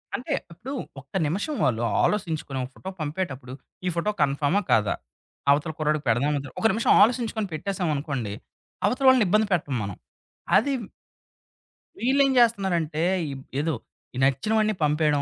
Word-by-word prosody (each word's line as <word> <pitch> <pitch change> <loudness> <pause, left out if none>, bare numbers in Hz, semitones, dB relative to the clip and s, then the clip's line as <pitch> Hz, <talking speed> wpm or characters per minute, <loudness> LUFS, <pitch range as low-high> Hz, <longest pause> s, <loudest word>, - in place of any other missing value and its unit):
అంటే, 250 - -3 0.2
ఇప్పుడు 240 +11 -7 0.3
ఒక్క 140 +1 -18
నిమిషం 205 - -2
వాళ్ళు 120 -2 +1 0.2
ఆలోసించుకొనో 160 -9 -1
ఒక - - -11
ఫోటో 190 - -7
పంపేటప్పుడు, 145 -5 -4 0.3
ఈ - - +2
ఫోటో 170 +5 0
కన్‌ఫర్మా 145 +6 +2
కాదా? 105 -2 +3 0.6
అవతల 150 +3 +2
కుర్రాడికి 150 -1 +1
పెడదామా 140 +6 +2
ఒద్దా? 140 -1 -8
ఒక - - -2
నిమిషం 225 +4 +2
ఆలోసించుకొని 225 -2 +2
పెట్టేసామనుకోండి 150 - -2 0.5
అవతల 255 +2 +1
వాళ్ళని 255 -4 +5
ఇబ్బంది 215 +4 +3
పెట్టం 150 -6 0
మనం. 100 -1 -5 0.6
అది 280 +7 +4 1.3
వీళ్ళేం 270 +3 +3
జేస్తున్నారంటే, 190 -10 +2 0.3
ఇబ్ 135 -1 -9 0.2
ఏదో 160 +2 0 0.4
ఈ - - -5
నచ్చినవన్నీ 215 - +2
పంపేయడం. 150 -1 +2
160 Hz, 135 wpm, -25 LUFS, 140-215 Hz, 1.3 s, వాళ్ళని